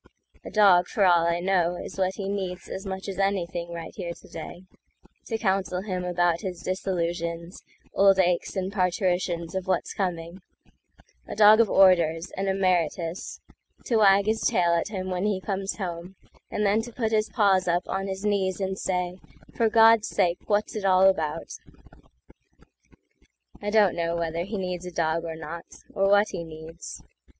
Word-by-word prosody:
A -, -, -8 dB
dog, 190 Hz, -4 st, +5 dB
for 200 Hz, -, +1 dB
all 170 Hz, -2 st, +4 dB
I 170 Hz, 0 st, 0 dB
know, 180 Hz, -1 st, +1 dB
is 185 Hz, -, -8 dB
what 190 Hz, 0 st, 0 dB
he 195 Hz, -, -5 dB
needsAs 190 Hz, 0 st, -5 dB
much 190 Hz, +1 st, -5 dB
as 195 Hz, -1 st, -5 dB
anything 175 Hz, -3 st, -1 dB
right 170 Hz, -1 st, -7 dB
here 175 Hz, -4 st, -5 dB
to -, -, -17 dB
day, 180 Hz, -, -9 dB, 0.6 s
To 225 Hz, -, -2 dB
counsel 190 Hz, -3 st, -1 dB
him 185 Hz, -3 st, -3 dB
about 175 Hz, -1 st, +1 dB
his 180 Hz, -3 st, -6 dB
disillusions, 170 Hz, -2 st, -3 dB, 0.3 s
Old 195 Hz, 0 st, +5 dB
aches, 180 Hz, 0 st, +1 dB
and 190 Hz, 0 st, -3 dB
parturitions 180 Hz, -2 st, -1 dB
of 190 Hz, -1 st, -4 dB
what's 185 Hz, -2 st, -1 dB
coming,—A 180 Hz, -1 st, -8 dB
dog 215 Hz, +1 st, +7 dB
of 230 Hz, -3 st, +4 dB
orders, 170 Hz, -4 st, +4 dB
an 195 Hz, +1 st, -2 dB
emeritus, 180 Hz, -3 st, -1 dB, 0.4 s
To 235 Hz, -, +1 dB
wag 200 Hz, -2 st, +5 dB
his 220 Hz, +1 st, 0 dB
tail 175 Hz, -1 st, +2 dB
at 170 Hz, +2 st, 0 dB
him 185 Hz, -3 st, -5 dB
when 180 Hz, +2 st, -1 dB
he 205 Hz, -3 st, 0 dB
comes 195 Hz, 0 st, -3 dB
home, 180 Hz, -1 st, -6 dB, 0.3 s
And 210 Hz, -, -1 dB
then 205 Hz, +2 st, +3 dB
to 240 Hz, +2 st, -9 dB
put 225 Hz, -2 st, -2 dB
his 215 Hz, -1 st, +1 dB
paws 195 Hz, -5 st, +2 dB
up 175 Hz, +1 st, 0 dB
on 195 Hz, 0 st, -3 dB
his 190 Hz, +1 st, -5 dB
kneesAnd 190 Hz, -1 st, -1 dB
say, 180 Hz, -1 st, -2 dB, 0.3 s
"For 230 Hz, -2 st, +1 dB
God's 225 Hz, 0 st, +5 dB
sake, 180 Hz, -3 st, 0 dB
what's 210 Hz, +1 st, 0 dB
it 215 Hz, -, -4 dB
all 190 Hz, 0 st, +5 dB
about?"I 165 Hz, +4 st, -8 dB
don't 205 Hz, -3 st, +4 dB
know 170 Hz, 0 st, -1 dB
whether 170 Hz, 0 st, -2 dB
he 210 Hz, +2 st, -5 dB
needs 180 Hz, -2 st, -4 dB
a -, -, -6 dB
dog 165 Hz, 0 st, -1 dB
or 165 Hz, -1 st, -5 dB
not—Or 170 Hz, +5 st, -4 dB
what 205 Hz, +1 st, +4 dB
he 175 Hz, -3 st, -5 dB
needs. 160 Hz, +1 st, -10 dB
185 Hz, 165 wpm, -26 LUFS, 170-195 Hz, 0.6 s, dog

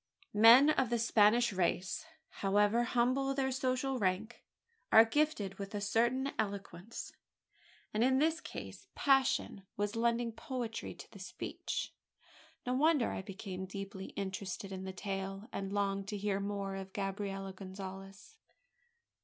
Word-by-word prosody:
Men 235 Hz, +8 st, +8 dB
of 265 Hz, -6 st, +1 dB
the 240 Hz, -, +1 dB
Spanish 225 Hz, 0 st, +4 dB
race 185 Hz, -, -1 dB, 0.3 s
however 205 Hz, +3 st, +3 dB
humble 255 Hz, +3 st, +1 dB
their 265 Hz, -1 st, 0 dB
social 260 Hz, 0 st, 0 dB
rank 200 Hz, +4 st, -1 dB, 0.5 s
are 220 Hz, +1 st, +9 dB
gifted 225 Hz, -7 st, 0 dB
with 200 Hz, +1 st, -5 dB
a -, -, -1 dB
certain 240 Hz, +6 st, +1 dB
eloquence; 200 Hz, 0 st, -4 dB, 0.8 s
and 215 Hz, +2 st, +2 dB
in 260 Hz, +1 st, +4 dB
this 320 Hz, +4 st, +2 dB
case -, -, -8 dB
passion 270 Hz, -7 st, +2 dB, 0.2 s
was 205 Hz, +1 st, -1 dB
lending 235 Hz, 0 st, +1 dB
poetry 240 Hz, -2 st, -5 dB
to -, -, -12 dB
the -, -, -12 dB
speech. -, -, -5 dB, 0.7 s
No 250 Hz, -, 0 dB
wonder 290 Hz, -1 st, +3 dB
I -, -, -3 dB
became 190 Hz, -1 st, -6 dB
deeply 195 Hz, 0 st, -6 dB
interested 195 Hz, 0 st, -4 dB
in 190 Hz, 0 st, -5 dB
the 190 Hz, -, -4 dB
tale, 195 Hz, +1 st, -4 dB
and 195 Hz, 0 st, -3 dB
longed 200 Hz, -1 st, -1 dB
to 210 Hz, 0 st, -3 dB
hear 200 Hz, -1 st, -1 dB
more 200 Hz, -1 st, -3 dB
of 190 Hz, 0 st, -7 dB
Gabriella 195 Hz, -1 st, -3 dB
Gonzales. 195 Hz, -, -9 dB
205 Hz, 135 wpm, -34 LUFS, 195-245 Hz, 0.8 s, are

